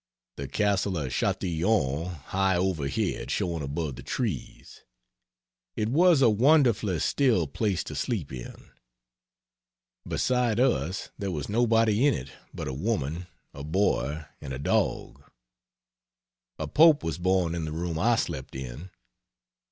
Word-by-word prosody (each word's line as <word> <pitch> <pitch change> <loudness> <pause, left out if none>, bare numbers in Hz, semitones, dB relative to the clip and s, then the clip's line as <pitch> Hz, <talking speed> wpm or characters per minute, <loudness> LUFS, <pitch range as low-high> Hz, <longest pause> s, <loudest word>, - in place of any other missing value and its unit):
The 70 - -5
castle 100 -1 0
of 70 -5 -3
Chatillon 85 -4 0
high 95 +3 -1
overhead 85 -6 -1
showing 85 -3 -1
above 70 -1 -3
the - - -8
trees. - - -4 0.9
It 105 0 -1
was 165 +1 +5
a - - +7
wonderfully 115 - +3
still 115 - +2
place 95 +5 -1
to - - -7
sleep - - -3
in. 60 -2 -9 1.4
Beside 125 -3 +1
us 95 - 0
there 100 - -2
was 75 -6 -4
nobody 115 0 +3
in 140 - +3
it 70 +2 -7 0.2
but - - -6
a 65 - -3
woman, 85 - -2 0.3
a 70 - -8
boy 80 -2 0 0.2
and 65 - -7
a - - -4
dog. 70 - -1 1.3
A - - -4
Pope 155 -1 +5
was 80 +1 -3
born 90 -2 +1
in 85 -2 -3
the 75 - -5
room 80 0 -3
I 120 +6 +3
slept 75 -13 -4
in. 65 +7 -7
90 Hz, 135 wpm, -27 LUFS, 75-110 Hz, 1.4 s, a